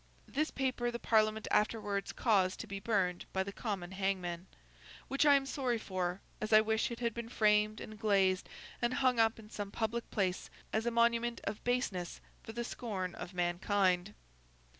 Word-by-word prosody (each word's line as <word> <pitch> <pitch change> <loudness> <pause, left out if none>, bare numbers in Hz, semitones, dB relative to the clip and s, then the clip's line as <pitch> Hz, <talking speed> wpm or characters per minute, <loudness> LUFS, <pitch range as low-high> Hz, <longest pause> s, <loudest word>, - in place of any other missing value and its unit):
This 310 +3 0
paper 255 -2 -1
the 235 - -3
Parliament 220 -2 +2
afterwards 205 -2 +1
caused 195 -5 +2
to - - -6
be 200 -2 -5
burned 190 -4 0
by 190 - +1
the 200 - -6
common 195 -6 -4
hangman; 190 -2 -2 0.6
which 275 +3 +2
I 285 - +8
am 275 -1 +2
sorry 260 -4 -1
for, 185 -3 -3 0.2
as 215 - -3
I 215 - +9
wish 220 0 +1
it 235 - -6
had 235 -2 0
been 235 0 -6
framed 215 -1 +3
and 215 -1 -9
glazed 195 -4 +2 0.3
and 240 +1 +1
hung 255 -3 +2
up 225 0 +4
in 215 -1 -13
some 205 -3 -4
public 225 +2 -2
place, 190 -3 -1 0.2
as 220 +2 0
a - - +5
monument 235 0 +2
of 210 +1 -4
baseness 215 -8 -1 0.2
for - - -8
the 235 +1 -3
scorn 195 -7 -4
of 180 - -8
mankind. 180 +2 +1
215 Hz, 180 wpm, -34 LUFS, 190-235 Hz, 0.6 s, I